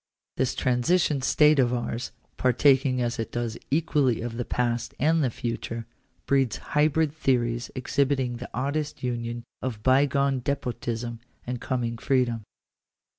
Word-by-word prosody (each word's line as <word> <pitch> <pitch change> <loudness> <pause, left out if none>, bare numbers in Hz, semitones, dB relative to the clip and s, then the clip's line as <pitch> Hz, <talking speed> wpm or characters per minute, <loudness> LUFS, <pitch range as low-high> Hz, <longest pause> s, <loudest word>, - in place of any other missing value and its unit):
This 130 - 0
transition 135 +4 +2
state 150 +2 +4
of 125 -2 +4
ours, 120 0 -3 0.2
partaking 130 0 +3
as 120 -1 -2
it 115 - -3
does 120 -2 -2
equally 145 -5 +2
of 115 0 -4
the 120 - -2
past 120 -1 -1
and 160 +3 +3
the 130 - +2
future, 115 0 -4 0.4
breeds 135 -5 +2 0.2
hybrid 150 0 +3
theories 120 -5 0
exhibiting 130 -1 0
the 125 - -8
oddest 145 +4 -2
union 120 -1 -3 0.2
of 115 -5 -4
bygone 140 +1 +3
despotism 120 -3 -3 0.3
and 125 0 -4
coming 120 -2 -2
freedom. 125 -4 +1
125 Hz, 130 wpm, -26 LUFS, 120-140 Hz, 0.4 s, state